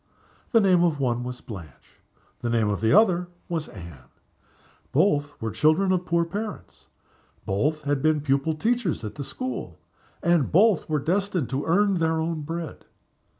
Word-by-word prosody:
The 230 - +6
name 185 -4 +4
of 160 -4 +1
one 125 -2 0
was 125 0 -6
Blanche. 85 - -11 0.4
The 120 - -3
name 115 -3 +2
of 100 -1 -2
the 110 - +2
other 180 -3 +4 0.2
was 165 -3 -3
Anne. 85 -9 -12 0.8
Both 145 -3 +1
were 110 -1 -3
the - - -13
children 170 +5 +3
of 180 -1 0
poor 170 0 +2
parents, 205 +5 -7 0.6
both 150 +10 0
had 145 -1 0
been 155 0 +2
pupil 140 +2 +1
teachers 220 - 0
at 105 - -5
the 145 - -6
school; 255 - -5 0.5
and 170 -5 +2
both 195 0 +4
were 155 - +1
destined 180 -1 -1
to 135 +2 -2
earn 195 +2 +3
their 160 0 +1
own 160 0 -2
bread. 165 +1 -6
155 Hz, 165 wpm, -25 LUFS, 135-180 Hz, 0.8 s, The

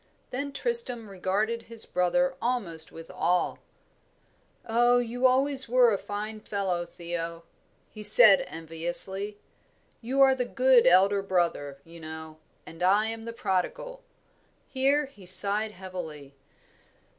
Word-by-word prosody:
Then 280 +3 -5
Tristram 275 - +1
regarded 200 +4 -3
his 230 -1 -6
brother 265 +10 -1
almost 195 -10 -3
with 165 +2 -12
awe. 180 0 -1 1.1
"Oh, 240 +1 +2
you 245 0 -4
were 260 - +5
always 265 0 +1
a 240 -4 +3
fine 210 +1 -7
fellow, 190 -5 -4
Theo," 170 -1 -7 0.4
he 215 - -13
said, 210 -1 +8
enviously. 175 +5 0 0.6
"You 255 +4 -4
are 270 -1 +5
the 260 -1 -2
good 255 -2 +3
elder 195 +3 +3
brother, 170 -7 -2
you 165 0 -14
know, 160 0 -10 0.3
and 165 - -14
I 205 +4 +2
am 225 0 -8
the 230 - -6
prodigal." - - -4 0.7
Here 280 +3 0
he 205 -9 -17
sighed 205 +4 +4
heavily. 170 -7 -10
205 Hz, 125 wpm, -26 LUFS, 175-245 Hz, 1.1 s, said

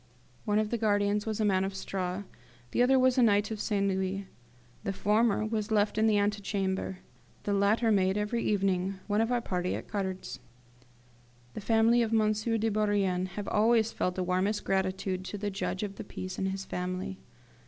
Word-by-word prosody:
One 210 -1 +1
of 215 0 0
the 235 - -1
guardians 205 -1 +1
was 220 -1 -2
a 215 - +2
man 190 -2 +2
of 195 0 -3
straw; 190 0 -3 0.5
the - - +1
other 260 +2 +5
was 255 0 +4
a - - +6
knight 205 -2 +3
of 215 -1 -3
St. 200 -2 0
Louis. 190 +1 -1 0.6
The 195 - -2
former 215 +2 +2
was 215 -1 -2
left 210 -1 +2
in 220 +1 +3
the 215 -1 +3
antechamber; 200 -2 -1 0.5
the 205 - -1
latter 215 +3 +3
made, 190 -1 +2
every 210 +3 -1
evening, 195 -2 +1
one 210 +1 +1
of 225 +2 0
our 245 -1 +1
party 180 -4 -2
at - - -7
cards. 190 -2 -4 1.1
The - - -6
family 225 +2 +4
of 225 -1 0
M. 215 -1 +3
de 225 +1 0
Bourrienne 200 -3 +1
have 205 -1 -4
always 225 +1 +3
felt 180 - -1
the 185 - -1
warmest 185 +4 0
gratitude 190 -1 -1
to 205 - -5
the 205 0 -3
judge 190 0 -3
of 200 -1 -5
the - - -5
peace 185 -1 -6
and 190 - 0
his 190 0 -4
family. 180 - -4
205 Hz, 190 wpm, -29 LUFS, 190-215 Hz, 1.1 s, a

